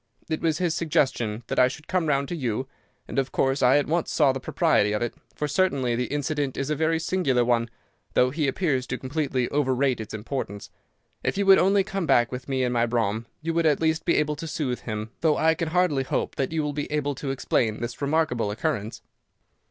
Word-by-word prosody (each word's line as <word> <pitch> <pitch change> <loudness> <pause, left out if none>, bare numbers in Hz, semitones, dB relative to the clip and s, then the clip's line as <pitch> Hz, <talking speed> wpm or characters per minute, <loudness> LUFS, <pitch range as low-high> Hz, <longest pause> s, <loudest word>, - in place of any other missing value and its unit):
It 160 - -2
was 160 -2 +1
his 175 -3 0
suggestion 125 -9 0
that - - -1
I 125 - +7
should 150 +4 -8
come 180 -3 0
round 140 -1 +1
to 175 - -3
you, 130 -4 -2 0.4
and - - -1
of 135 -1 -1
course 135 +1 +1
I 130 +3 +5
at 145 - +2
once 165 +2 0
saw 145 -4 +4
the 135 - -4
propriety 105 -4 +2
of 105 - 0
it, 120 - -2 0.2
for 150 - -2
certainly 140 -7 +1
the 125 +1 0
incident 145 -1 -2
is 140 +2 -2
a - - +1
very 160 +2 +1
singular 160 -8 +1
one, 120 -1 +1 0.5
though 125 0 +4
he 150 +1 0
appears 135 -3 0
to 125 - -3
completely 130 -2 -1
overrate 130 -3 +1
its 110 0 -7
importance. 105 -2 -5 0.5
If - - -1
you 200 - +1
would 195 0 +7
only 195 +1 +4
come 195 -3 -3
back 120 -1 +4
with 125 +1 -6
me 130 -1 0
in 125 - 0
my 120 -1 +2
brougham, 115 -1 -1 0.2
you 165 +1 -1
would 165 -1 +2
at 150 -3 +3
least 160 0 +1
be 170 - +2
able 150 0 +1
to 165 - -6
soothe 140 -6 -2
him, 110 -1 -5
though 155 -2 +2
I 160 0 +4
can 165 0 -3
hardly 165 -4 +2
hope 130 - -2
that 135 - -2
you 160 -1 0
will 150 0 -2
be 145 0 -4
able 145 -1 0
to 135 +1 -5
explain 115 -4 0
this 120 +2 -5
remarkable 140 -7 +1
occurrence." 115 -2 -3
140 Hz, 225 wpm, -25 LUFS, 125-160 Hz, 0.5 s, I